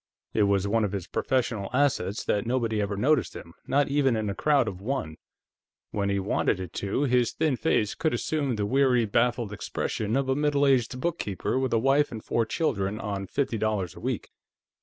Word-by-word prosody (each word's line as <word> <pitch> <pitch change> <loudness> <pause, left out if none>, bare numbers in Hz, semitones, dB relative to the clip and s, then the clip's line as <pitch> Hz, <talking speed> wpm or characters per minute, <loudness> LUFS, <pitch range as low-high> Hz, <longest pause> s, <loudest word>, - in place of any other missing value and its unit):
It 110 - +2
was 100 0 +2
one 110 +2 +2
of 105 - -1
his 95 -4 -3
professional 115 -3 -1
assets 130 -8 +1
that 105 +2 0
nobody 115 -4 0
ever 100 0 -2
noticed 135 +4 +2
him, 85 - -10
not 140 +1 +2
even 140 -3 +2
in 110 -2 -1
a - - -3
crowd 140 +2 +2
of 95 -3 -5
one; 100 - -3 0.7
when 100 -1 -1
he 100 - +1
wanted 95 0 0
it 90 -2 -6
to, 100 +8 0
his 125 -3 +2
thin 155 -4 +1
face 115 -7 +1
could 160 - 0
assume 140 0 -1
the 105 -1 -1
weary, 130 0 +3
baffled 115 0 +1
expression 105 +2 -2
of 135 -1 0
a 130 - +2
middle 145 -1 +2
aged 125 -2 +2
book 170 +3 -1
keeper 100 +5 -2
with 130 -1 -1
a 115 - +3
wife 135 +5 +3
and 110 -2 -7
four 115 -1 0
children 105 -8 -1
on 100 -3 -4
fifty 120 0 -1
dollars 105 -6 -1
a - - -10
week. - - -3
115 Hz, 200 wpm, -27 LUFS, 100-135 Hz, 0.7 s, weary